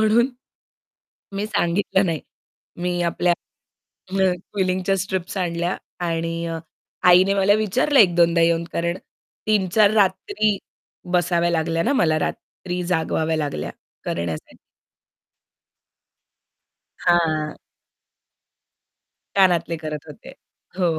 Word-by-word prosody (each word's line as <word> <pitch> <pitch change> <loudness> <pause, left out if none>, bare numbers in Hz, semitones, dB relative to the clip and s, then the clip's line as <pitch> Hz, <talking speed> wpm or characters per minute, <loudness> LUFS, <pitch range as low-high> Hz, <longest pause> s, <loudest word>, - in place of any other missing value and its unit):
म्हणून 220 +3 +4 1.1
मी 205 +2 -1
सांगितलं 190 -1 +1
नाही. 160 -3 -1 0.6
मी 175 0 -2
आपल्या 175 +1 +1 0.8
अ, 195 0 0 0.3
क्विलिंगच्या 185 0 +1
स्ट्रिप्स 190 0 -3
आणल्या 175 0 -1 0.3
आणि 165 0 -2 0.6
आईने 180 +2 +6
मला 200 +1 +4
विचारलं, 245 +7 +2
एक-दोनदा 170 -3 +5
येऊन. 165 0 +3
कारण 170 +1 -1 0.5
3-4 205 0 +3
रात्री 210 - +2 0.6
बसाव्या 175 -1 +2
लागल्या 165 0 0
ना 270 - +1
मला, 160 - +2
रात्री 180 +3 -4
जागवाव्या 160 -2 0
लागल्या 145 - -3 0.3
करण्यासाठी. 85 -2 -4 2.4
हां. 160 -3 +1 1.8
कानातले 175 -3 +3
करत 155 -1 -5
होते. 150 - -11 0.5
हो. 170 -4 +1
175 Hz, 90 wpm, -22 LUFS, 165-195 Hz, 2.4 s, आईने